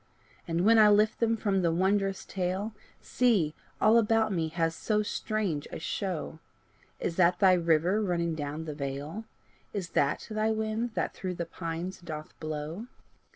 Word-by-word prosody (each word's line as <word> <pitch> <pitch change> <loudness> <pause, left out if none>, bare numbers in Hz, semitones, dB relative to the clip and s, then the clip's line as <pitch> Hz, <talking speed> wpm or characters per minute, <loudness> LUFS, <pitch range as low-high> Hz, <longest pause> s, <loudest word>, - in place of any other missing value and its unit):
And 170 +2 0
when 225 +1 +6
I 210 -1 +8
lift 210 +1 +3
them 230 -1 +2
from 200 -3 +1
the 170 -2 +2
wondrous 195 +2 +1
tale, 190 +3 -2 0.3
See, 210 -12 +2 0.3
all 220 +2 +6
about 225 0 +2
me 165 -3 0
has 165 0 -1
so 210 -1 0
strange 205 -8 -2
a - - -5
show! 165 -2 -3 0.6
Is 165 - -3
that 175 -1 +4
thy 190 -2 +6
river 170 +3 +2
running 170 -4 0
down 150 +1 -4
the 155 - -4
vale? 145 +8 -5 0.5
Is 185 -5 -3
that 140 -3 +1
thy 215 0 +1
wind 220 +1 -1
that - - -1
through 185 -1 -4
the 170 - -3
pines 165 +2 -5
doth 155 -3 -7
blow? 155 +7 -5
185 Hz, 160 wpm, -29 LUFS, 165-215 Hz, 0.6 s, I